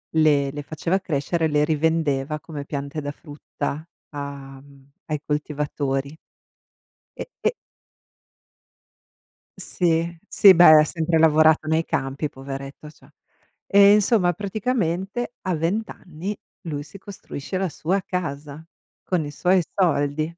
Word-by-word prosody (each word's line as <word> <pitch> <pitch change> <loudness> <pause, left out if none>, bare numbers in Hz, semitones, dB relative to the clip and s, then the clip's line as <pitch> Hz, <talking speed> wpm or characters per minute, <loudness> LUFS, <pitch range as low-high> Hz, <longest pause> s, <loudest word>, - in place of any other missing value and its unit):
le 145 -3 +3
le 145 0 -6
faceva 165 +6 -1
crescere, 160 0 -1
le 150 0 +2
rivendeva 155 -2 0
come 150 -3 -7
piante 140 +2 -5
da 145 0 -4
frutta 145 +1 -6 0.3
a 140 -2 -8
mhmm, 140 -1 -20 0.2
ai 150 -2 -2
coltivatori. 145 -1 -2 1.0
E - - -4 0.2
e - - +4 2.1
Sì, 170 -1 -1
sì, 195 -2 +7
beh, 175 +1 +6 0.2
ha - - +6
sempre 165 0 0
lavorato 155 -1 +4
nei 160 +1 +2
campi, 140 -1 -2
poveretto, 135 +2 -8
cioè. 150 - -20 0.6
Eh, 200 0 +7
insomma, 205 -3 +3
praticamente 205 +2 -2
a 185 -3 -1
20 190 +8 -1
anni, 180 +4 -7 0.2
lui 145 -4 -5
si 160 +6 -13
costruisce 190 -4 -7
la 190 - 0
sua 185 +6 -1
casa, 150 -4 -5 0.4
con 175 -5 -1
i 145 - -6
suoi 180 +4 +2
soldi. 155 -5 +1
155 Hz, 125 wpm, -23 LUFS, 145-180 Hz, 2.1 s, sì